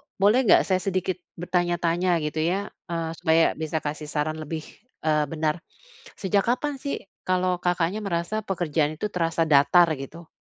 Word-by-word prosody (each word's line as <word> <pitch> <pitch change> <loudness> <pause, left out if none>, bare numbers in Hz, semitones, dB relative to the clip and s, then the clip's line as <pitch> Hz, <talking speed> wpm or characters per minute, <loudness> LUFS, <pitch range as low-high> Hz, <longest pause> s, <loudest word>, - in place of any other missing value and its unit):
boleh 205 +5 +4
nggak - - +7
saya 185 -1 +1
sedikit 185 -1 -1 0.2
bertanya-tanya 175 0 +1
gitu 150 +1 -2
ya, 200 +2 -2 0.2
eee, 165 -1 -2
supaya 165 -1 +4 0.2
bisa 160 0 -2
kasih 150 0 -4
saran 155 +1 -2
lebih, 155 0 -5 0.4
eee, 155 -1 +2
benar. 155 +2 -1 0.6
Sejak 195 0 +2
kapan 290 +3 -1
sih 280 - -2 0.2
kalau 185 0 +1
Kakaknya 180 +4 0
merasa 195 +3 -2
pekerjaan 160 -6 0
itu 210 - -1
terasa 165 -3 0
datar, 155 +4 +6
gitu? 160 +5 -9
170 Hz, 150 wpm, -25 LUFS, 155-185 Hz, 0.6 s, nggak